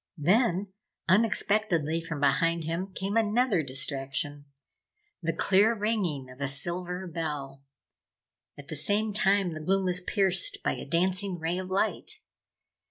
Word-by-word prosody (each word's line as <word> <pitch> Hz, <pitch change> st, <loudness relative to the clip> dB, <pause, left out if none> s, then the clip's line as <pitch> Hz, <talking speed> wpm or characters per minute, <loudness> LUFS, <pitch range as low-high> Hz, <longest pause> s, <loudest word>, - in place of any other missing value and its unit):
Then, 190 Hz, -, +2 dB, 0.3 s
unexpectedly 190 Hz, -5 st, +2 dB
from 165 Hz, -3 st, -5 dB
behind 160 Hz, +4 st, +2 dB
him 170 Hz, +5 st, -3 dB
came 195 Hz, +2 st, -3 dB
another 225 Hz, -3 st, +2 dB
distraction 140 Hz, +1 st, -3 dB, 0.8 s
the 165 Hz, -1 st, 0 dB
clear 200 Hz, +7 st, +3 dB
ringing 200 Hz, -, -1 dB
of 125 Hz, +2 st, -13 dB
a 140 Hz, -, 0 dB
silver 175 Hz, +6 st, -3 dB
bell. 150 Hz, -5 st, -5 dB, 1.0 s
At 145 Hz, -1 st, -12 dB
the 155 Hz, -, -3 dB
same 205 Hz, +8 st, +1 dB
time 195 Hz, -3 st, +2 dB
the 155 Hz, -, -6 dB
gloom 195 Hz, +3 st, +1 dB
was 180 Hz, 0 st, +1 dB
pierced 190 Hz, 0 st, +3 dB
by -, -, +1 dB
a -, -, -5 dB
dancing 185 Hz, +2 st, 0 dB
ray 170 Hz, +2 st, -2 dB
of 185 Hz, 0 st, -6 dB
light. 220 Hz, -, -1 dB
180 Hz, 135 wpm, -28 LUFS, 155-200 Hz, 1.0 s, clear